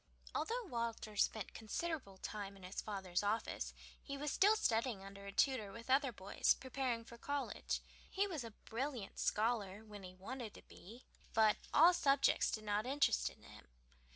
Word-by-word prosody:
Although 480 +2 -1
Walter 230 - -3
spent 205 0 +1
considerable 225 - -3
time 200 0 -5
in 190 - -15
his 185 +2 -4
father's 190 -4 -2
office, 210 +2 -1 0.3
he 280 -1 -5
was 295 +1 -1
still 415 +3 +6
studying 230 - +1
under 200 0 -9
a - - -4
tutor 220 -3 +2
with 230 +5 -6
other 270 0 +4
boys, 200 -2 +2
preparing 255 -3 -2
for 235 0 -12
college. 285 +2 -2 0.3
He 395 +1 +2
was 330 -10 -3
a 230 - -5 0.2
brilliant 240 -2 -3
scholar 215 -2 +1
when 210 -2 -9
he 185 -1 -9
wanted 225 +4 -6
to - - -12
be, 225 +8 -13 0.3
but 220 -1 +5
all 340 +4 +8
subjects 280 -5 +4
did 215 - -2
not 210 +2 0
interest 275 +1 +3
him. - - -17
230 Hz, 165 wpm, -38 LUFS, 205-275 Hz, 0.3 s, all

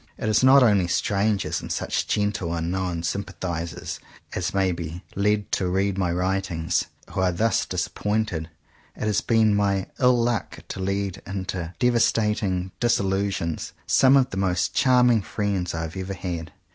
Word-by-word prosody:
It - - -3
is 110 - +3
not 135 +1 +7
only 100 -6 +4
strangers, 100 +3 0
and - - -7
such - - -1
gentle, 100 -5 -1
unknown 85 0 -2
sympathizers 85 -2 -4 0.3
as 90 - -2
may 95 -1 +1
be 85 +1 -6
led 105 +1 +1
to 95 - 0
read 95 +1 +1
my 95 -3 0
writings, 90 -2 0 0.3
who - - -3
are 90 -1 +3
thus 110 +6 +1
disap - - -2
pointed. 105 -7 -1 0.5
It - - -6
has 105 -1 +1
been 110 -2 +3
my 100 -2 +1
ill 125 -1 +5
luck 120 -1 -1
to - - -5
lead 100 0 -2
into 95 -2 -4
devastating 105 -6 +1
disillusion 95 -7 0 0.3
some 135 +1 +5
of 130 -1 +2
the 95 - -5
most 90 -2 0
charming 125 -3 +4
friends 100 -4 -2
I 80 - -2
have 80 +2 -6
ever 95 +1 -4
had. 85 -4 -5
95 Hz, 160 wpm, -24 LUFS, 90-105 Hz, 0.5 s, not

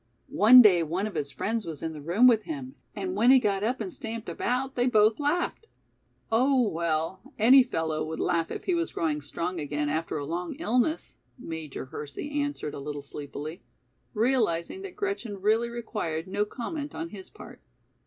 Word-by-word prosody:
One 245 +4 +9
day 185 -5 +6
one 170 +5 -1
of 215 - -5
his 140 - -2
friends 220 - -2
was 160 -4 -7
in 160 0 -3
the 150 - -8
room 175 - +3
with 235 -3 +6
him 270 -4 -6 0.2
and 190 -3 -3
when 230 +5 +4
he 265 - +9
got 205 -5 +1
up 245 +4 0
and 370 - -5
stamped 230 -4 -6
about 260 +2 -1
they 245 -1 +1
both 215 -1 +4
laughed." 345 +9 -1 0.6
"Oh, 255 +1 +3
well, 165 +1 -1 0.2
any 255 +5 +7
fellow 160 -10 -1
would 160 +1 -5
laugh 165 -1 0
if - - -6
he 370 - 0
was 335 -1 -1
growing 150 -2 -1
strong 170 +5 -4
again 145 0 -2
after 160 +1 -2
a 145 - -4
long 170 - -4
illness," 270 +2 -1 0.2
Major 160 - -6
Hersey 150 - -7
answered 285 - -3
a - - -6
little 145 0 -5
sleepily, 145 +3 -7 0.5
realizing 225 - +1
that 390 -2 -8
Gretchen 385 - -3
really 220 +4 +2
required 210 -9 -4
no 205 +2 0
comment 285 +7 -5
on 165 +1 -4
his 190 -1 -10
part. - - -13
210 Hz, 185 wpm, -27 LUFS, 160-250 Hz, 0.6 s, One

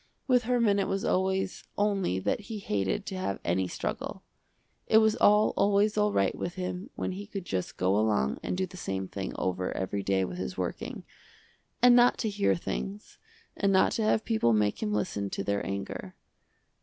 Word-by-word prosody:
With 250 -3 +3
Herman 235 -5 +3
it 195 - 0
was 195 +3 -1
always 190 0 0
only 200 - +1
that 95 - 0
he 220 - -4
hated 105 - -1
to 195 - -5
have 100 - -2
any 90 +2 +1
struggle. - - -4 0.6
It 220 - +5
was 220 -1 +5
all 210 +1 +5
always 205 +1 +3
all 210 0 +2
right 100 - +2
with 175 - -5
him 180 +4 -4
when - - -2
he 200 +2 -7
could 195 -4 -6
just 95 - -3
go 95 +2 +2
along 105 -11 +1
and - - -3
do 190 - +1
the 185 0 -12
same 95 - -3
thing 95 0 -5
over 90 0 -1
every 95 +2 -2
day 95 -1 +1
with 90 0 -6
his 90 0 -4
working, 90 -1 -4 0.8
and 245 -1 +8
not 245 0 +5
to 220 - -1
hear 100 - +2
things, 65 -4 -5 0.4
and 200 0 +1
not 190 -1 +4
to - - -1
have 215 0 +2
people 220 - +2
make 105 -1 +1
him 215 -1 -1
listen 100 - -1
to 95 - -3
their 100 +1 -1
anger. 100 -1 -5
180 Hz, 195 wpm, -29 LUFS, -, 0.8 s, and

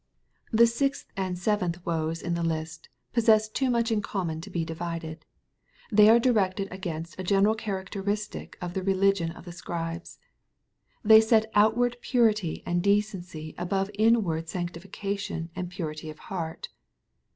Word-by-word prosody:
The 230 +1 +6
sixth 275 +4 -1
and 185 -2 -2
aeventh 180 -3 0
" - - -31
woes'' 165 -1 -2
in 175 - -1
the 170 - -1
list 160 -1 -3 0.2
pos 235 -2 +1
sess 220 -1 +5
to - - -34
t - - +2
nmch 235 -1 +1
in 215 -2 +1
common 170 -6 -3
to - - -9
be 165 -2 -2
divided. 165 -1 -5 0.7
They 210 0 +7
are 230 - +8
directed 200 -5 +1
against 170 -3 -6
a - - -3
general 200 +3 +3
cHaracteristic 205 0 -4
of 175 -1 -5
the 190 - -2
religion 195 -2 +2
of 170 - -11
the 175 - -7
Scribes. 170 0 -5 0.9
They 220 0 +8
set 220 0 +3
outward 235 +3 +3
purity 215 - +1
and 175 0 0
de 200 +2 +4
cenc 190 -5 -9
y - - -13
above 195 +3 -1
in 225 +2 +4
ward 165 -2 -3
sanctification 180 0 -4
and 180 -1 -4
purity 155 -3 -5
of 155 - -9
heart. 165 -3 -5
190 Hz, 165 wpm, -27 LUFS, 170-215 Hz, 0.9 s, are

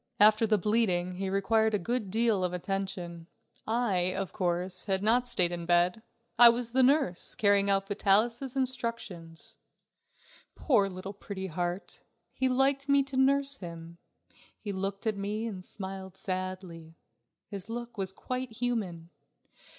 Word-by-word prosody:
After 215 +2 +6
the 215 0 +3
bleeding 185 -4 0
he 195 0 -2
required 220 +3 +2
a - - +3
good 215 +2 -2
deal 220 -2 +2
of 180 -1 -1
attention. 180 -2 -4 0.4
I, 200 -6 +1
of 195 -2 -4
course, 180 0 -1
had 190 -1 0
not 240 +3 +3
stayed 180 -7 +2
in 170 -1 -5
bed. 175 +4 +3 0.4
I 240 -1 +11
was 235 0 -1
the 260 +2 +3
nurse, 260 - +2
carrying 200 -1 +3
out 195 0 +2
Vitalis' 230 +6 +1
instructions. 230 -11 -4 1.0
Poor 210 -9 +2
little 185 +1 -7
Pretty 200 -1 -7
Heart! 175 +2 -4 0.3
he 260 - 0
liked 275 +2 +1
me 280 0 +5
to 270 0 -8
nurse 275 +1 +2
him. 170 -3 -9 0.6
He 205 - -5
looked 195 +2 -4
at 215 -2 0
me 210 +3 -3
and 195 -5 -5
smiled 190 -1 -7
sadly. 185 -4 -5 0.5
His 200 +1 -8
look 240 +1 -6
was 190 -3 -3
quite 255 +4 -5
human. 205 -9 -3
200 Hz, 145 wpm, -29 LUFS, 185-235 Hz, 1.0 s, I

